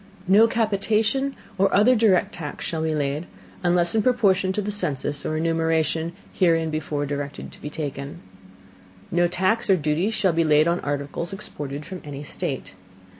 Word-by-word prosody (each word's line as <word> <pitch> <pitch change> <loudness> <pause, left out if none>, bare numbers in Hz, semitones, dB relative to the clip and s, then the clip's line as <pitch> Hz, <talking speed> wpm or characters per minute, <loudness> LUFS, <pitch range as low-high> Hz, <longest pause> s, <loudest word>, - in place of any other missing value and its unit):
No 210 +4 +6
Capitation, 225 +4 +1 0.2
or 195 0 +4
other 225 +6 +5
direct, 215 -5 +3
Tax 150 -3 -6
shall 160 -1 -2
be 160 -1 0
laid, 145 +3 -2 0.3
unless 175 -1 +2
in 220 - +3
Proportion 200 -6 +3
to 190 - -2
the 210 0 -2
Census 145 -7 -2
or 155 - -1
Enumeration 165 0 0 0.2
herein 165 -3 +2
before 150 -1 -2
directed 145 0 -5
to - - -15
be 150 - -5
taken. 145 -2 -5 0.9
No 175 0 +3
Tax 185 +6 0
or 190 - +7
Duty 155 +5 0
shall 195 -5 +1
be 165 +1 +2
laid 155 0 +4
on 170 +1 +1
Articles 145 +5 -3
exported 150 -8 -6
from 185 -2 -7
any 145 -1 -7
State. 140 -4 -4
165 Hz, 165 wpm, -24 LUFS, 150-195 Hz, 0.9 s, or